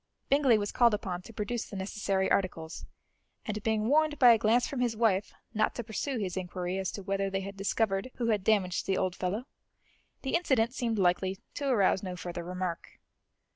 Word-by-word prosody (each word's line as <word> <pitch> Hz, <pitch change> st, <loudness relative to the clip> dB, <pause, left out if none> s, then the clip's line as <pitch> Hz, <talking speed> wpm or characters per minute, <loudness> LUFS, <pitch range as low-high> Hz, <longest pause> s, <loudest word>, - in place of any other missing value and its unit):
Bingley 275 Hz, -5 st, +5 dB
was 205 Hz, -1 st, -2 dB
called 235 Hz, -3 st, +4 dB
upon 185 Hz, -4 st, -4 dB
to 230 Hz, -, -12 dB
produce 220 Hz, +2 st, -3 dB
the -, -, -8 dB
necessary 195 Hz, 0 st, -1 dB
articles, 165 Hz, -4 st, -1 dB, 0.6 s
and 215 Hz, -2 st, -3 dB
being 220 Hz, 0 st, 0 dB
warned 305 Hz, +2 st, +3 dB
by 250 Hz, -3 st, +8 dB
a 230 Hz, -, +6 dB
glance 230 Hz, +3 st, +3 dB
from 280 Hz, -4 st, -4 dB
his 240 Hz, -3 st, 0 dB
wife 210 Hz, -3 st, +2 dB, 0.2 s
not 215 Hz, 0 st, +1 dB
to 240 Hz, -, -3 dB
pursue 240 Hz, +5 st, -3 dB
his 190 Hz, -5 st, -3 dB
inquiry 180 Hz, 0 st, -3 dB
as 190 Hz, -, -2 dB
to 200 Hz, -, -6 dB
whether 195 Hz, 0 st, -1 dB
they 195 Hz, 0 st, -2 dB
had 195 Hz, +1 st, -7 dB
discovered 195 Hz, +2 st, 0 dB
who 235 Hz, -2 st, -1 dB
had 210 Hz, -4 st, +1 dB
damaged 190 Hz, -4 st, +1 dB
the 190 Hz, -, +1 dB
old 185 Hz, -1 st, 0 dB
fellow, 195 Hz, +7 st, -2 dB, 0.8 s
the 265 Hz, -, -2 dB
incident 250 Hz, -8 st, +2 dB
seemed 230 Hz, -4 st, -1 dB
likely 185 Hz, 0 st, +1 dB, 0.2 s
to 285 Hz, -, -3 dB
arouse 200 Hz, -7 st, +3 dB
no 185 Hz, -2 st, -5 dB
further 175 Hz, 0 st, -5 dB
remark. 180 Hz, -1 st, -5 dB
205 Hz, 195 wpm, -30 LUFS, 185-230 Hz, 0.8 s, by